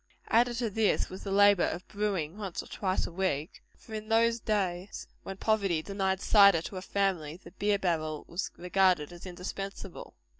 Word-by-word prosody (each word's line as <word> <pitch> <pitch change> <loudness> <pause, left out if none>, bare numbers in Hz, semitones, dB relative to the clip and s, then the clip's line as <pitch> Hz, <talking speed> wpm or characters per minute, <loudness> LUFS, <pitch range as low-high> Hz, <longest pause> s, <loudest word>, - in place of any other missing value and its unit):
Added 240 +1 +3
to 240 - -1
all 220 - -2
this, 215 0 +1
was 185 - -8
the 195 - -4
labor 205 -1 +6
of 175 +3 -5
brewing 200 -6 -2
once 200 -4 -5
or - - -14
twice 190 -2 -1
a - - -7
week; 170 -3 -2 0.2
for 220 - -13
in 215 0 -6
those 230 +1 +3
days, 195 -4 -2 0.2
when 195 - -7
poverty 195 -7 +1
denied 195 0 -1
cider 200 -6 +6
to 190 - -6
a - - -4
family, 185 -6 -1
the - - -14
beer 205 +1 +1
barrel 155 -5 -2
was 175 +3 -3
regarded 180 -3 +2
as 175 +2 -10
indispensable. 190 +1 -7
195 Hz, 185 wpm, -30 LUFS, 175-205 Hz, 0.2 s, labor